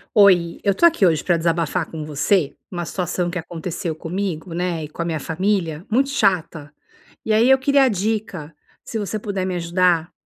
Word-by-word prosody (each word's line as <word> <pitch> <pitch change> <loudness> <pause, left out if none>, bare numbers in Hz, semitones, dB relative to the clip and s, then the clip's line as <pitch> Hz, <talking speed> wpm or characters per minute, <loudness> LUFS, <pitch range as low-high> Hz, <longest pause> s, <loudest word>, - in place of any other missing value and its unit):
Oi, 180 -5 +5
eu 200 - +2
estou 340 - +3
aqui 320 - +2
hoje 160 -4 +2
pra 175 -2 +2
desabafar 165 0 0
com 160 -2 -6
você 150 +2 +1 0.2
uma 175 -2 -4
situação 175 0 -2
que 180 - -3
aconteceu 165 0 -5
comigo, 175 0 -4
né, 175 -2 -2
e 150 - -7
com 155 - -7
a - - -1
minha 160 -3 -2
família 170 0 -1
muito 265 +5 +2
chata. 175 - 0 0.5
E 220 - -1
aí 225 +4 +4
eu 265 - +7
queria 275 0 +3
dica, 200 -7 -2 0.3
se 225 - -5
você 210 +1 -3
puder 200 -3 -3
me 185 -1 -2
ajudar, 175 -1 +1
180 Hz, 185 wpm, -21 LUFS, 165-200 Hz, 0.5 s, eu